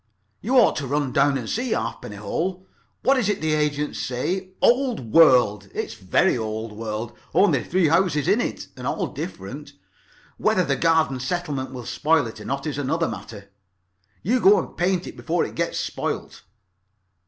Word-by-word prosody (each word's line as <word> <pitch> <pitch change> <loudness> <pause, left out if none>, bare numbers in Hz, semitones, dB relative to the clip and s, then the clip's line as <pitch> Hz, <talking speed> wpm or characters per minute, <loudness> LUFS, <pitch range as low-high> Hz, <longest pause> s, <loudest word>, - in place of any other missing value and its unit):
"You 260 - -1
ought 245 - +5
to 140 - -3
run 145 0 0
down 140 0 +3
and 120 -4 -5
see 245 - -1
Halfpenny 105 - -4
Hole. 180 - -3 0.4
What 270 +1 +4
is 210 -4 0
it 205 - 0
the 155 0 0
agents 150 -1 -1
say? 180 +10 -2
Old 240 - +2
world. 125 -10 +5
It's - - -3
very 90 - +2
old 110 -1 -4
world. 110 +2 -5 0.2
Only 170 -11 +4
three 180 -2 +2
houses 165 -4 +2
in 225 - +3
it, - - -4
and - - -6
all - - -1
different. - - -7 0.6
Whether 215 -4 +2
the 140 - +1
garden 160 -3 +2
settlement 140 -1 -3
will 125 -3 -7
spoil 150 +4 +2
it 110 -1 -8
or - - -9
not 140 +3 -3
is 145 -2 -3
another 160 +4 0
matter. 100 -3 -8 0.7
You 245 +8 +2
go 205 -2 +6
and - - -4
paint 180 0 0
it - - -8
before 170 +2 -1
it - - -8
gets 170 0 -2
spoilt. - - -4
150 Hz, 175 wpm, -23 LUFS, 125-185 Hz, 0.7 s, go